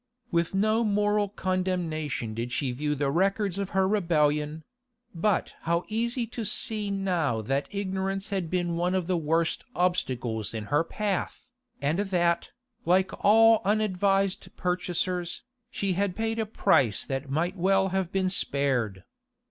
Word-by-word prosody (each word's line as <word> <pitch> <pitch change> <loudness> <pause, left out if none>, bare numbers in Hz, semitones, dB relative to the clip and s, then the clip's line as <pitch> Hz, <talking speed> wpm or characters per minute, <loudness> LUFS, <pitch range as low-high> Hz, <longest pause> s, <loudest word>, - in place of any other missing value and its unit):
With 170 +1 0
no 215 +3 +2
moral 210 -1 +1
condemnation 175 - -2
did 115 +2 -4
she 130 0 -1
view 150 +4 -1
the 140 -1 0
records 195 +3 +1
of 200 -1 -2
her 190 0 +4
rebellion; 155 -5 +1 0.5
but 190 +4 0
how 170 +1 0
easy 235 +3 -1
to 230 0 -6
see 210 0 0
now 180 - 0
that 135 +5 -1
ignorance 195 0 -3
had 190 -5 -2
been 175 -1 -1
one 180 +2 +1
of 185 -2 0
the 185 +1 0
worst 165 +1 0
obstacles 125 - -1
in 110 - -3
her 150 +3 +4
path, 200 +2 -3 0.4
and 150 +6 +1
that, 175 -4 +1 0.3
like 185 +2 +3
all 225 +1 +6
unadvised 195 -1 +1
purchasers, 180 0 -1 0.3
she 200 -7 -1
had 195 0 0
paid 225 0 -1
a 220 - -1
price 140 - +2
that 135 +1 -4
might 170 +7 0
well 195 +1 +2
have 190 -2 -1
been 190 -1 +1
spared. 125 - 0
185 Hz, 145 wpm, -27 LUFS, 155-200 Hz, 0.5 s, all